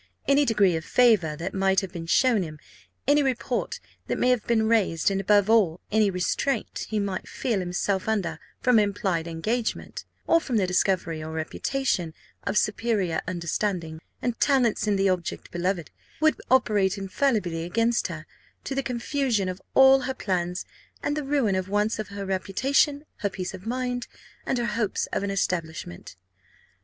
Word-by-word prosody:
Any 280 +1 +4
degree 205 -7 +3
of 160 - -3
favour 210 -9 +3
that 165 +3 -5
might 195 0 +2
have 190 -2 -6
been 165 -1 -7
shown 240 +3 +3
him, 155 -3 -6 0.5
any 290 +1 +5
report 255 -2 -1 0.3
that - - -1
may 250 - +2
have 250 -3 0
been 220 -2 +2
raised, 200 -6 +2
and 195 0 0
above 205 0 +4
all, 200 -7 +3
any 215 -1 +4
restraint 195 +7 -1
he 220 - -1
might 200 -2 -2
feel 230 -6 -1
himself 190 +3 -1
under 175 -7 -1 0.2
from 245 -3 +5
implied 195 -5 0
engagement, 220 +9 -3 0.2
or 330 0 +4
from 250 -8 -1
the 195 - +2
discovery 180 -3 0
or 160 - -6
reputation 165 +2 -2 0.3
of 200 - 0
superior 210 -6 +1
understanding 170 -1 -2 0.2
and 245 -2 -1
talents 250 -7 +2
in 205 - +3
the 195 0 +2
object 180 -3 -2
beloved, 175 -1 -2 0.3
would 315 +1 +2
operate 210 -6 +3
infallibly 195 -4 0
against 230 +7 +1
her, 155 -3 -7 0.4
to - - -4
the 275 - 0
confusion 250 -4 -1
of 185 +1 -5
all 265 0 +8
her 260 0 -3
plans, 180 -2 -2 0.4
and 290 - 0
the 300 - -2
ruin 270 -7 +1
at 185 0 -2
once 210 +2 0
of 215 - -3
her 200 0 -6
reputation, 265 +10 +1
her 200 - -1
peace 185 -1 -5
of 190 +3 -9
mind, 250 0 -2 0.4
and 265 - +1
her 240 - 0
hopes 210 -1 -1
of - - 0
an 200 - -2
establishment. 160 - -3
200 Hz, 170 wpm, -26 LUFS, 180-240 Hz, 0.5 s, all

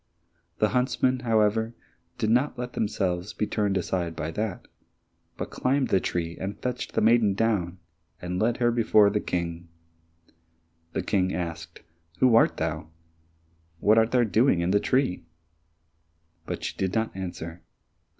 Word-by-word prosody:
The 105 - +2
huntsmen, 130 0 +1
however, 110 -1 +1 0.4
did 110 - 0
not 125 +4 +2
let 125 0 -5
themselves 95 -3 -1
be - - -1
turned 105 -2 0
aside 85 -2 -2
by 80 0 -3
that, 105 +1 -4 0.7
but - - -5
climbed 130 0 0
the 95 - +3
tree 85 -2 -3
and 100 +2 -4
fetched 125 -1 -4
the - - +2
maiden 110 -3 +4
down 100 -5 0 0.4
and 90 0 -4
led 115 +3 +1
her 120 -1 +2
before 110 -3 +4
the 105 - +1
King. 85 -2 -4 1.2
The - - -2
King 95 -3 0
asked, 85 -1 -5 0.4
"Who 125 -2 +4
art 115 - +4
thou? 80 - -3 0.9
What 110 +5 +5
art 110 0 +3
thou 125 0 +3
doing 110 -4 +3
on 90 - 0
the 100 - +4
tree?" 130 -5 0 1.2
But - - -4
she - - -3
did 95 +1 -2
not 110 -2 -1
answer. 90 -2 -6
105 Hz, 150 wpm, -26 LUFS, 90-115 Hz, 1.2 s, What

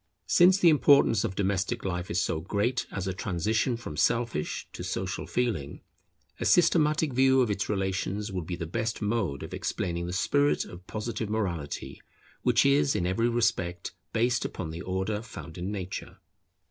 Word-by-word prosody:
Since 180 +2 +6
the 180 -3 +6
importance 140 -8 +5
of 95 - -2
domestic 100 0 -1
life 90 0 -3
is 90 - 0
so 85 -2 0
great 100 +8 -1
as 95 -2 -4
a 95 - -1
transition 110 +6 0
from 115 -10 -7
selfish 115 -4 0
to - - -6
social - - -3
feeling, 110 - -2 0.6
a - - -2
systematic 155 -4 +3
view 130 +1 +4
of 120 -4 +1
its 100 - -2
relations 100 +1 -2
will 95 -1 -2
be 85 +2 -4
the 85 -1 -5
best 110 +6 -3
mode 105 - -1
of - - -8
explaining 85 -1 -2
the 90 - -4
spirit 145 +9 +2
of 90 +1 -12
Positive 110 0 -4
morality, 90 -9 -3 0.4
which - - +3
is 70 +1 +3
in 85 - 0
every 115 +6 +1
respect 90 -7 0 0.2
based 120 +2 +1
upon 80 -3 -4
the 85 +2 -6
order 95 +3 -2
found 100 -8 -9
in 90 +2 -4
nature. 95 -3 -6
100 Hz, 170 wpm, -28 LUFS, 90-120 Hz, 0.6 s, Since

